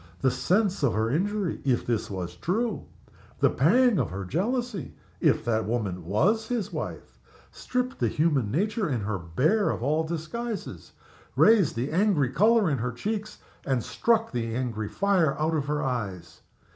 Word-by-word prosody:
The 130 Hz, -, +3 dB
sense 185 Hz, -, +1 dB
of 135 Hz, -7 st, +2 dB
her 110 Hz, +1 st, +1 dB
injury 195 Hz, +3 st, -1 dB
(if 130 Hz, -3 st, +1 dB
this 115 Hz, -3 st, -1 dB
was 90 Hz, -3 st, -5 dB
true), 215 Hz, -, -2 dB, 0.5 s
the -, -, +4 dB
pang 220 Hz, -, +4 dB
of -, -, 0 dB
her 95 Hz, +1 st, -5 dB
jealousy 215 Hz, -, -2 dB, 0.2 s
(if -, -, +2 dB
that 110 Hz, -2 st, 0 dB
woman 100 Hz, -7 st, -2 dB
was 205 Hz, -, +1 dB
his 235 Hz, -5 st, -2 dB
wife), -, -, -6 dB, 0.3 s
stripped 250 Hz, +1 st, -3 dB
the 120 Hz, -, +2 dB
human 145 Hz, -3 st, +1 dB
nature 205 Hz, -, 0 dB
in 125 Hz, -5 st, -1 dB
her 100 Hz, -1 st, -2 dB
bare 135 Hz, -, +1 dB
of -, -, -3 dB
all 155 Hz, +4 st, +1 dB
disguises, 170 Hz, +8 st, -5 dB, 0.4 s
raised 210 Hz, -, +5 dB
the 120 Hz, +4 st, -2 dB
angry 165 Hz, -, +2 dB
color 215 Hz, -, +4 dB
in 140 Hz, -5 st, 0 dB
her 125 Hz, +2 st, -2 dB
cheeks, 215 Hz, -, -4 dB, 0.3 s
and 130 Hz, -5 st, 0 dB
struck 225 Hz, -1 st, +1 dB
the 115 Hz, -2 st, -2 dB
angry 115 Hz, -4 st, -3 dB
fire 180 Hz, -8 st, +2 dB
out 155 Hz, +2 st, 0 dB
of 145 Hz, -3 st, -1 dB
her 150 Hz, 0 st, -1 dB
eyes. 95 Hz, -10 st, -4 dB
150 Hz, 165 wpm, -27 LUFS, -, 0.5 s, raised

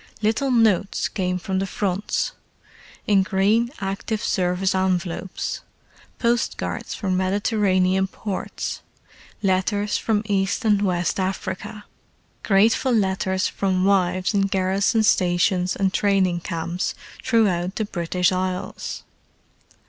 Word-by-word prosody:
Little 225 Hz, +6 st, +1 dB
notes 220 Hz, -5 st, +2 dB
came 180 Hz, -2 st, -2 dB
from 190 Hz, +1 st, -2 dB
the 195 Hz, -, -1 dB
Fronts, 195 Hz, +1 st, -1 dB, 0.7 s
in 200 Hz, -2 st, +4 dB
green 205 Hz, +5 st, +2 dB
Active 195 Hz, +2 st, -3 dB
Service 180 Hz, +1 st, +1 dB
envelopes: 185 Hz, -1 st, -1 dB, 0.6 s
postcards 235 Hz, 0 st, -1 dB
from 190 Hz, -4 st, -1 dB
Mediterranean 190 Hz, -1 st, +1 dB
ports; 195 Hz, 0 st, -5 dB, 0.6 s
letters 200 Hz, +2 st, +1 dB
from 215 Hz, -2 st, 0 dB
East 200 Hz, +3 st, 0 dB
and 205 Hz, -2 st, +3 dB
West 180 Hz, -2 st, 0 dB
Africa; 190 Hz, +2 st, -4 dB, 0.6 s
grateful 220 Hz, +5 st, +3 dB
letters 190 Hz, -3 st, +1 dB
from 185 Hz, -1 st, 0 dB
wives 185 Hz, 0 st, +2 dB
in 195 Hz, -1 st, +2 dB
garrison 195 Hz, +4 st, +1 dB
stations 180 Hz, -2 st, +2 dB
and 195 Hz, -1 st, 0 dB
training 190 Hz, -4 st, +2 dB
camps 170 Hz, +1 st, -3 dB, 0.3 s
throughout 190 Hz, -6 st, +1 dB
the 220 Hz, -, -1 dB
British 180 Hz, -1 st, 0 dB
Isles. 185 Hz, 0 st, -3 dB
190 Hz, 105 wpm, -23 LUFS, 185-205 Hz, 0.7 s, in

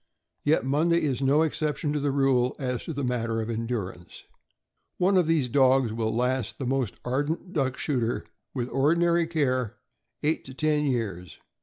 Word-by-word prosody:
Yet 150 Hz, -2 st, +2 dB
Monday 165 Hz, +5 st, +2 dB
is 135 Hz, -4 st, 0 dB
no 140 Hz, +4 st, +4 dB
exception 150 Hz, -2 st, -1 dB
to 150 Hz, -, 0 dB
the 145 Hz, 0 st, 0 dB
rule 135 Hz, -2 st, +2 dB
as 125 Hz, -3 st, -3 dB
to 165 Hz, -, -4 dB
the 140 Hz, -1 st, -3 dB
matter 115 Hz, -2 st, -1 dB
of 110 Hz, +1 st, -2 dB
endurance. 110 Hz, -6 st, -5 dB, 0.7 s
One 190 Hz, +2 st, +3 dB
of 180 Hz, -4 st, +4 dB
these 160 Hz, -6 st, +2 dB
dogs 130 Hz, -2 st, +3 dB
will 110 Hz, -1 st, -1 dB
last 125 Hz, -1 st, -1 dB
the 135 Hz, -, -4 dB
most 130 Hz, -3 st, -1 dB
ardent 145 Hz, +8 st, -2 dB
duck 130 Hz, -4 st, 0 dB
shooter, 120 Hz, -6 st, -1 dB, 0.3 s
with 125 Hz, -3 st, -3 dB
ordinary 170 Hz, +5 st, +2 dB
care, 130 Hz, -8 st, 0 dB, 0.5 s
eight 155 Hz, +2 st, +1 dB
to 130 Hz, -, -9 dB
ten 150 Hz, 0 st, +1 dB
years. 100 Hz, -, -3 dB
135 Hz, 165 wpm, -27 LUFS, 120-150 Hz, 0.7 s, no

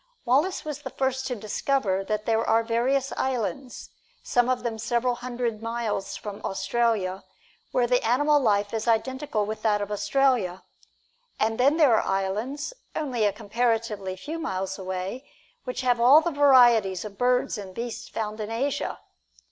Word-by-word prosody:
Wallace 290 Hz, +11 st, +1 dB
was 295 Hz, -1 st, -5 dB
the -, -, -6 dB
first 265 Hz, 0 st, -1 dB
to 250 Hz, -, -2 dB
discover 215 Hz, -2 st, -1 dB
that 210 Hz, +1 st, -3 dB
there 225 Hz, 0 st, +2 dB
are 225 Hz, 0 st, +3 dB
various 255 Hz, +4 st, 0 dB
islands, 260 Hz, +1 st, -3 dB, 0.3 s
some 245 Hz, 0 st, +2 dB
of 255 Hz, -1 st, 0 dB
them 225 Hz, -2 st, -3 dB
several 240 Hz, +2 st, 0 dB
hundred 240 Hz, -2 st, -3 dB
miles 230 Hz, -4 st, -3 dB
from 205 Hz, -1 st, -7 dB
Australia, 200 Hz, -2 st, 0 dB, 0.5 s
where 250 Hz, -, +2 dB
the 250 Hz, +1 st, +2 dB
animal 290 Hz, +6 st, +3 dB
life 205 Hz, -5 st, +1 dB
is 225 Hz, +1 st, -2 dB
identical 230 Hz, -1 st, 0 dB
with 215 Hz, +1 st, -5 dB
that 210 Hz, -2 st, +2 dB
of 205 Hz, 0 st, -4 dB
Australia. 205 Hz, -3 st, +1 dB, 0.8 s
And 225 Hz, +1 st, 0 dB
then 280 Hz, +5 st, +4 dB
there 295 Hz, -7 st, +5 dB
are -, -, +3 dB
islands, 215 Hz, -, -2 dB, 0.2 s
only 250 Hz, -7 st, 0 dB
a 205 Hz, -, +3 dB
comparatively 220 Hz, -3 st, -1 dB
few 310 Hz, -, -6 dB
miles 190 Hz, -, -3 dB
away, 190 Hz, +8 st, -5 dB, 0.4 s
which 250 Hz, 0 st, -3 dB
have 245 Hz, -2 st, +2 dB
all 265 Hz, +6 st, +8 dB
the 340 Hz, +1 st, -2 dB
varieties 240 Hz, -, +5 dB
of 200 Hz, -2 st, -9 dB
birds 250 Hz, 0 st, +2 dB
and 190 Hz, -2 st, -9 dB
beasts 235 Hz, 0 st, -5 dB
found 215 Hz, -1 st, -4 dB
in 210 Hz, 0 st, -4 dB
Asia. 260 Hz, +5 st, -2 dB
235 Hz, 160 wpm, -26 LUFS, 210-260 Hz, 0.8 s, all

